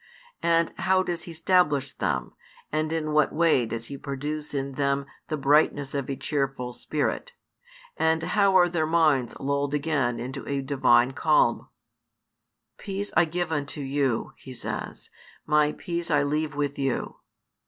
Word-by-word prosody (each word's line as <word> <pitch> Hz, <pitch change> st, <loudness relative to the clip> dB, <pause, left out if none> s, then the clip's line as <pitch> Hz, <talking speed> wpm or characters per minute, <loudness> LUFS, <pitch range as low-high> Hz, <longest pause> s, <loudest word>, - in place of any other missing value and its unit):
And 165 Hz, -1 st, +2 dB
how 185 Hz, 0 st, +3 dB
does 175 Hz, -2 st, -4 dB
He 170 Hz, -, -8 dB
stablish 160 Hz, -5 st, +2 dB
them, 65 Hz, -3 st, -2 dB, 0.4 s
and 155 Hz, +1 st, -1 dB
in 155 Hz, -2 st, -1 dB
what 150 Hz, 0 st, +3 dB
way 155 Hz, -7 st, +3 dB
does 115 Hz, 0 st, -5 dB
He 140 Hz, +3 st, -8 dB
produce 150 Hz, +2 st, -4 dB
in 140 Hz, -1 st, -2 dB
them 140 Hz, 0 st, 0 dB, 0.2 s
the 155 Hz, -, -2 dB
brightness 145 Hz, -1 st, +2 dB
of 140 Hz, -2 st, -3 dB
a 135 Hz, -, -1 dB
cheerful 135 Hz, -4 st, -2 dB
spirit, 155 Hz, -, -2 dB, 0.6 s
and 160 Hz, 0 st, +2 dB
how 195 Hz, +2 st, +3 dB
are 175 Hz, -1 st, +6 dB
their 165 Hz, -3 st, 0 dB
minds 155 Hz, -7 st, +2 dB
lulled 140 Hz, +1 st, -1 dB
again 140 Hz, -5 st, 0 dB
into 125 Hz, +2 st, -5 dB
a 140 Hz, -1 st, 0 dB
Divine 130 Hz, -2 st, +3 dB
calm? -, -, +2 dB, 1.1 s
Peace 200 Hz, 0 st, -4 dB
I 175 Hz, -, +5 dB
give 170 Hz, +1 st, -3 dB
unto 145 Hz, -1 st, -3 dB
you, 135 Hz, -3 st, -1 dB
He 130 Hz, -, -11 dB
says, -, -, -6 dB, 0.3 s
My 150 Hz, 0 st, +3 dB
peace 170 Hz, -1 st, -4 dB
I 145 Hz, -2 st, +3 dB
leave 150 Hz, +1 st, -1 dB
with 145 Hz, -1 st, -2 dB
you. 135 Hz, -2 st, -2 dB
150 Hz, 155 wpm, -26 LUFS, 135-165 Hz, 1.1 s, are